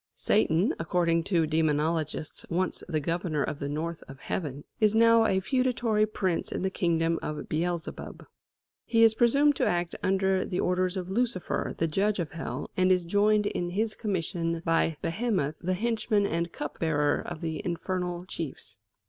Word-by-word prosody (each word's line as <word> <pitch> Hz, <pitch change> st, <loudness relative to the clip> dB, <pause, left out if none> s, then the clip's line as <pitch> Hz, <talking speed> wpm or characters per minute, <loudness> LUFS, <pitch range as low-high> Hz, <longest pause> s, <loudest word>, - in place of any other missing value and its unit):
Satan, 190 Hz, -1 st, +2 dB
according 165 Hz, 0 st, +1 dB
to 170 Hz, -5 st, +2 dB
demonologists 155 Hz, 0 st, 0 dB
once 185 Hz, +2 st, -1 dB
the 155 Hz, -, +1 dB
governor 165 Hz, -1 st, -1 dB
of 145 Hz, -, -4 dB
the 140 Hz, -, -3 dB
north 160 Hz, +3 st, -3 dB
of 135 Hz, 0 st, -11 dB
Heaven, 145 Hz, -4 st, -4 dB, 0.2 s
is 215 Hz, 0 st, +3 dB
now 230 Hz, 0 st, +6 dB
a 190 Hz, -2 st, +2 dB
feudatory 235 Hz, -1 st, +1 dB
prince 190 Hz, -5 st, -1 dB
in -, -, -3 dB
the 190 Hz, -, 0 dB
kingdom 165 Hz, -2 st, +1 dB
of 150 Hz, -1 st, -5 dB
Beelzebub. 170 Hz, +1 st, -3 dB, 0.6 s
He 230 Hz, -1 st, +3 dB
is 225 Hz, -1 st, +7 dB
presumed 280 Hz, +6 st, +4 dB
to -, -, +2 dB
act 175 Hz, 0 st, 0 dB
under 190 Hz, 0 st, +2 dB
the 180 Hz, -, -3 dB
orders 180 Hz, +1 st, +1 dB
of 185 Hz, 0 st, -4 dB
Lucifer, 230 Hz, -4 st, -1 dB
the 165 Hz, -, +1 dB
judge 195 Hz, +6 st, +1 dB
of 170 Hz, -5 st, -3 dB
Hell, 160 Hz, +1 st, -5 dB
and 185 Hz, 0 st, +3 dB
is 180 Hz, -2 st, +2 dB
joined 210 Hz, +3 st, +3 dB
in 175 Hz, -3 st, -2 dB
his 215 Hz, +4 st, -1 dB
commission 170 Hz, -5 st, -2 dB
by 165 Hz, -1 st, +2 dB
Behemoth, 175 Hz, -, -1 dB
the 185 Hz, +1 st, -1 dB
henchman 220 Hz, 0 st, +1 dB
and 170 Hz, -2 st, -1 dB
cupbearer 150 Hz, -3 st, 0 dB
of 175 Hz, -3 st, -7 dB
the 160 Hz, -2 st, -3 dB
infernal 180 Hz, 0 st, -3 dB
chiefs. 165 Hz, -6 st, -5 dB
175 Hz, 165 wpm, -28 LUFS, 165-205 Hz, 0.6 s, is